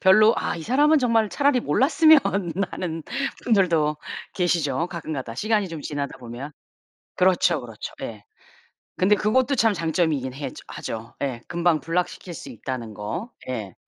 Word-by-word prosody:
별로 215 +4 +7
'아 - - -1
이 165 - -6
사람은 295 - +4
정말 230 -4 +2
차라리 280 0 +2
몰랐으면.' 315 +5 +5 0.5
하는 165 -3 -4 0.4
분들도 170 -9 +3 0.4
계시죠 170 -5 +1
가끔가다. 155 -9 -5
시간이 210 - +1
좀 165 -2 -6
지나다 145 -1 -4
보면. 125 +4 -8 0.6
그렇죠, 180 -3 +3
그렇죠. 115 -3 -8
예. 105 -3 -6 0.7
근데 200 +3 +4
그것도 255 +7 +2
참 225 -2 +4
장점이긴 160 -6 0
해죠 140 +1 -6
하죠. 115 0 -6
예. 130 -4 -2
금방 170 -2 +2
block시킬 175 +3 -2
수 140 - -8
있다는 120 -2 -6
거. 165 - -5 0.2
예. 110 -7 -4
170 Hz, 320 characters per minute, -24 LUFS, 135-210 Hz, 0.7 s, 별로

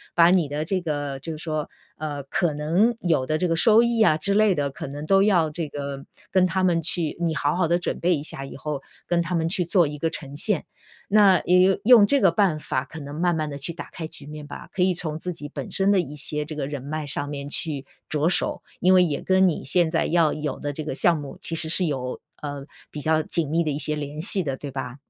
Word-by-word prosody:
把 170 0 +6
你 180 -5 +2
的 150 +2 -3
这 185 +2 -1
个 145 -4 -4
就 165 - -7
是 155 - -8
说， 155 -2 -3 0.3
呃， 145 -2 -5
可 165 +3 -1
能 170 +11 +1
有 160 -9 +1
的 155 - 0
这 180 - 0
个 165 - 0
收 220 +6 +5
益 235 -1 +1
啊 155 -8 +4
之 195 +6 +1
类 210 -2 +3
的， 145 -2 -1
可 135 - -7
能 145 +2 -7
都 195 +4 +4
要 175 -7 +3
这 160 +1 -4
个 140 0 -5 0.4
跟 185 -1 +3
他 185 +1 -1
们 175 -2 +2
去 165 -1 0
你 165 -2 -1
好 145 0 0
好 180 -2 +1
地 170 +2 +2
准 175 - -3
备 175 +1 +2
一 145 - -5
下， 135 -3 0
以 - - -10
后 145 -1 -5 0.3
跟 175 -1 +1
他 175 +1 -3
们 165 0 0
去 180 -1 0
做 170 -2 +3
一 150 0 -6
个 165 +2 -1
呈 140 -4 -8
现。 195 +2 +4 0.5
那 200 -3 +5
也 185 +2 +4
用 225 -2 +7
这 280 +3 +3
个 190 - +5
办 195 -6 +1
法 130 -3 -3
可 160 - -10
能 145 0 -8
慢 170 +2 0
慢 155 -1 -2
地 140 - -6
去 155 +4 -4
打 170 - -9
开 165 -2 -6
局 145 - -11
面 150 0 -9
吧， - - -10
可 185 - -3
以 185 0 +2
从 160 -3 -4
自 180 +2 -4
己 145 -3 -8
本 140 -2 -7
身 195 +1 +3
的 195 - +3
一 150 -4 -4
些 150 +1 -2
这 155 +1 -8
个 140 -2 -3
人 145 -2 -5
脉 155 +2 -4
上 145 0 -3
面 145 -1 -6
去 145 -4 -2 0.2
着 155 +2 +1
手。 180 - 0 0.2
因 185 +1 +4
为 185 -1 +6
也 150 -5 -2
跟 190 0 +3
你 165 - -2
现 165 +4 +3
在 165 - +1
要 165 -2 +2
有 150 -3 -4
的 145 - -3
这 155 - -5
个 140 - -4
项 170 +3 +3
目， 145 -2 -8
其 165 - -1
实 160 0 +4
是 180 +2 +5
有， 130 -4 -4 0.2
呃， 145 -2 -6 0.2
比 150 - -7
较 155 +1 +1
紧 160 -2 0
密 165 +2 +1
的 155 - -2
一 140 - -3
些 150 0 +1
联 150 +1 -6
系 190 +2 +7
的， 135 -4 -3
对 140 0 -7
吧？ 130 -2 -6
160 Hz, 280 characters per minute, -23 LUFS, 145-180 Hz, 0.5 s, 用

